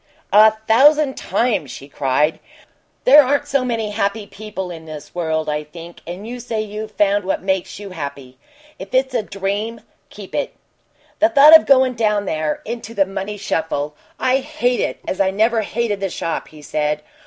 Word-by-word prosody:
"A 215 +1 +8 0.2
thousand 285 +4 +5
times!" 225 - -1
she 135 - -9
cried. 145 +2 0 0.6
"There 285 +4 +8
aren't 280 +2 0
so 275 -2 +1
many 225 -4 -2
happy 205 0 -1
people 195 -3 -7
in 165 -2 -9
this 155 -2 -10
world, 160 -2 -2
I 150 0 -2
think 170 +3 -12
and 180 +5 -7
you 245 +1 -6
say 235 -2 -4
you've 215 0 -5
found 205 0 +2
what 190 0 -2
makes 190 -1 -2
you 200 -1 -9
happy. 140 -5 -7 0.4
If 195 +5 -7
it's 260 0 +2
a 240 - +1
dream 205 +3 -4 0.3
keep - - -11
it!" - - -2 0.6
"The 325 - +5
thought 305 0 +8
of 320 - +6
going 260 -2 +5
down 210 -3 0
there 155 -3 -2
into 230 0 -6
the 195 -1 +3
money 195 +2 -5
shuffle 160 -6 -2 0.3
I 255 +1 +2
hate 265 -3 -1
it - - -2
as 190 - -1
I 190 - +3
never 220 +4 +2
hated 220 -1 -2
the 195 -1 -2
shop!" 165 -1 -4
he 155 -1 -15
said. 150 0 -2
205 Hz, 180 wpm, -19 LUFS, 165-235 Hz, 0.6 s, A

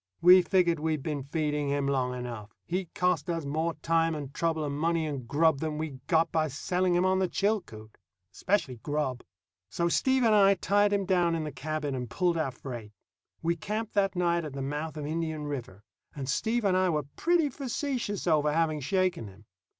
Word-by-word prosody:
We 180 +2 +8
figured 175 -3 +2
we'd 155 -2 -1
been 150 -3 -2
feeding 150 0 -1
him 140 0 0
long 130 -2 0
enough. 120 -4 -7
He'd 180 0 -3
cost 180 -4 +1
us 165 -3 -2
more 160 +4 -1
time 165 0 +2
and 140 -2 -6
trouble 160 -2 0
and 140 -1 -3
money 165 +2 0
and 140 -6 -5
grub 155 +1 +3
than 155 -1 -3
we'd 155 -4 -5
got 165 -1 +3
by 155 -1 +1
selling 180 +5 0
him 175 +1 +3
on 190 0 +2
the 190 - +2
Chilcoot 180 - -2 0.4
especially 160 - 0
grub. 140 -1 -2 0.5
So 170 +8 0
Steve 260 +7 +2
and 225 -2 +4
I 200 -1 +6
tied 205 +1 +2
him 200 -1 +1
down 175 -3 +2
in 160 - -2
the 150 - -4
cabin 145 +2 -3
and 125 -2 -4
pulled 175 - +1
our 155 - 0
freight. 120 -4 -8 0.5
We 170 +1 +1
camped 210 +5 -4
that 200 -1 +1
night 170 -1 +1
at 150 -3 -6
the 135 -1 -4
mouth 150 +3 -4
of 150 - -4
Indian 160 0 -3
River, 125 -8 -6 0.3
and 135 -3 -5
Steve 225 - 0
and 190 -2 +3
I 185 0 +3
were 150 -4 0
pretty 335 -3 +2
facetious 255 -5 -3
over 150 -3 +3
having 155 -1 +1
shaken 185 - 0
him. 100 +2 -15
160 Hz, 195 wpm, -29 LUFS, 145-185 Hz, 0.5 s, We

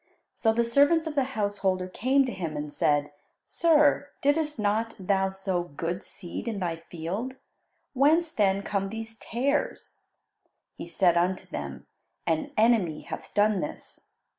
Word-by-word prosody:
So 225 - +2
the 235 +1 +1
servants 285 +7 +4
of 315 - -3
the 280 -2 +2
householder 195 -3 0
came 260 +8 +2
to 255 - -3
him 165 -7 -4
and 150 0 -5
said, 145 0 +1 0.3
"Sir, 300 -3 +3
didst 300 +1 +1
not 220 +2 0
thou 190 0 +1
sow 190 -2 -1
good 170 +2 -4
seed 180 +4 -7
in 225 -3 -2
thy 170 -3 -2
field? 190 +10 -4 0.6
Whence 310 +5 +3
then 200 -1 +2
come 195 -1 -1
these 225 +1 -7
tares?" 275 +5 -2 0.7
He - - -8
said 175 0 +3
unto 180 +2 +1
them, - - -6 0.4
"An 300 -2 0
enemy 215 -9 +3
hath - - -8
done 210 -1 +3
this." 150 - -7
210 Hz, 145 wpm, -27 LUFS, 185-265 Hz, 0.7 s, servants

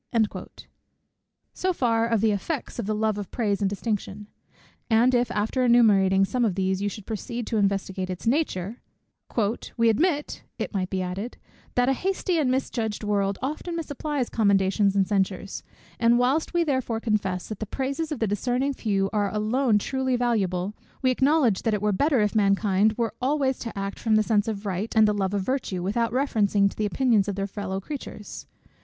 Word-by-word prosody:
So 370 0 0
far 230 -6 +1
of 230 -3 +1
the 220 -1 +3
effects 240 - -3
of 205 - -3
the 215 - 0
love 215 -1 0
of 200 - -6
praise 210 -4 -1
and 195 - +2
distinction: 205 0 -3 0.6
and 235 +3 +4
if 245 0 +2
after 220 +5 0
enumerating 200 -6 +5
some 245 +5 -1
of 210 -6 +1
these, 190 0 0
you 205 - 0
should 205 0 -9
proceed 230 +2 -4
to 225 - -1
investigate 195 -2 0
its 185 -1 -6
nature, 230 - -1 1.0
"We 230 -1 +4
admit," 295 - 0 0.2
it - - -4
might 190 -2 -1
be 190 -1 -1
added, 190 +6 -5 0.4
"that 245 0 +3
a 270 - +4
hasty 365 +2 -1
and 280 -4 +2
misjudging 225 -5 -2
world 200 -1 +1
often 310 +5 -3
misapplies 295 -4 -3
commendations 200 -1 +2
and 195 -2 +3
censures: 195 -1 -1 0.4
and 235 0 +4
whilst 260 +6 +1
we 345 -1 +2
therefore 260 -7 -1
confess, 205 -5 -1
that 215 - -6
the 215 - -4
praises 280 +7 -3
of 300 - -2
the 230 - 0
discerning 245 +7 0
few 200 -6 0
are 205 -2 +1
alone 220 +2 +2
truly 260 +4 -1
valuable; 205 -6 0 0.3
we 255 - +4
acknowledge 265 -5 +3
that 225 -2 +1
it 205 - -3
were 210 - +2
better 270 +5 +2
if 210 -1 +1
mankind 200 0 +3
were 230 -3 -1
always 270 0 +1
to 230 -3 -6
act 195 0 -4
from 220 -2 +2
the 215 - +4
sense 215 -1 +1
of 215 -2 -4
right 195 +4 -3
and 220 -1 +6
the 210 - +2
love 200 -1 -1
of 200 - 0
virtue, 205 -7 -2
without 230 +5 0
reference 235 -6 +1
to 200 -1 +4
the 215 - 0
opinions 225 -3 +2
of 200 - -2
their 195 0 -2
fellow 195 -1 -4
creatures. 215 -2 -8
215 Hz, 185 wpm, -25 LUFS, 200-250 Hz, 1.0 s, and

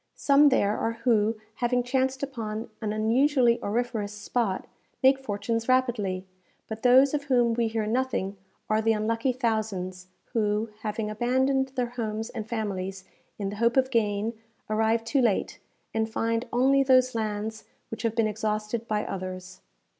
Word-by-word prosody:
Some 285 +1 +5
there 210 -6 +2
are 225 - 0
who, 225 -2 +3 0.2
having 245 0 +1
chanced 260 +1 0
upon 225 -5 -4
an 215 -2 -1
unusually 240 +3 +3
auriferous 215 -1 -2
spot, 210 -1 -2 0.4
make 265 +1 +6
fortunes 230 0 -2
rapidly; 220 -8 +1 0.4
but 220 0 -6
those 260 +3 +6
of 290 -1 -1
whom 245 -4 +3
we 230 0 +1
hear 220 -1 -1
nothing 220 -4 -1 0.3
are 215 0 +2
the 225 0 +3
unlucky 225 +4 0
thousands, 210 -7 -2 0.3
who, 215 0 0
having 215 0 -3
abandoned 260 +4 +1
their 245 -2 -1
homes 220 +1 -3
and 220 0 -6
families 195 -4 -3 0.3
in 200 -1 -3
the 205 - -7
hope 235 +3 +2
of 260 0 +3
gain, 215 -1 +1 0.4
arrive 220 +1 +2
too 245 +4 +1
late, 225 -5 0 0.3
and 220 0 0
find 230 +2 -1
only 270 +3 +4
those 255 -1 +4
lands 220 0 -3 0.3
which 225 0 -5
have 230 -1 -1
been 230 - +3
exhausted 215 +1 -2
by 210 -1 -1
others. 185 -1 -6
225 Hz, 155 wpm, -27 LUFS, 210-250 Hz, 0.4 s, make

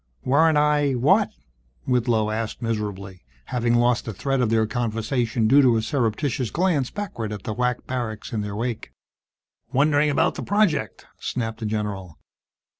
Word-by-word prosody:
"Weren't 155 +4 +4
I 150 -2 +3
what?" 130 +3 +3 0.6
Whitlow 115 -4 +1
asked 110 0 -3
miserably, 100 -5 -4 0.2
having 120 -1 0
lost 120 0 +2
the 110 - -4
thread 135 +6 0
of 120 - +1
their 110 0 +3
conversation 115 0 -1
due 140 +5 +6
to 125 -4 +4
a 110 - -1
surreptitious 125 0 -1
glance 165 - +1
backward 165 - -5
at 105 -2 -6
the 110 - -3
WAC 125 +1 -1
barracks 120 -4 -4
in 110 - -1
their 105 -1 -5
wake. 115 0 -4 0.8
"Wondering 145 +2 +3
about 145 - +2
the - - -6
project!" 165 - 0
snapped 115 -3 -3
the 110 - -3
general. 105 -6 -4
120 Hz, 155 wpm, -23 LUFS, 110-135 Hz, 0.8 s, due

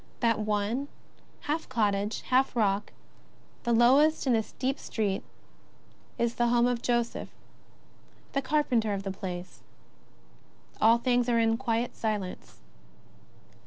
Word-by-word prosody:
That 230 -3 +2
one, 215 +5 -1 0.5
half 310 +2 -3
cottage, 205 -1 0
half 255 0 +1
rock, 205 -3 +1 0.7
the 240 - -1
lowest 270 +8 +4
in 255 - +3
the 225 - +3
steep 265 +5 -3
street, 205 -4 -2 1.0
is 235 0 0
the 240 0 +1
home 240 0 +3
of 245 -1 0
Joseph, 240 -1 -1 1.0
the 275 - +1
carpenter 255 -7 +1
of 195 - -5
the 195 - -3
place. 185 -2 -7 1.2
All 225 +2 +6
things 245 0 +1
are 235 - +3
in 225 0 +3
quiet 235 -1 -1
silence. 210 -4 -4
235 Hz, 125 wpm, -28 LUFS, 210-245 Hz, 1.2 s, All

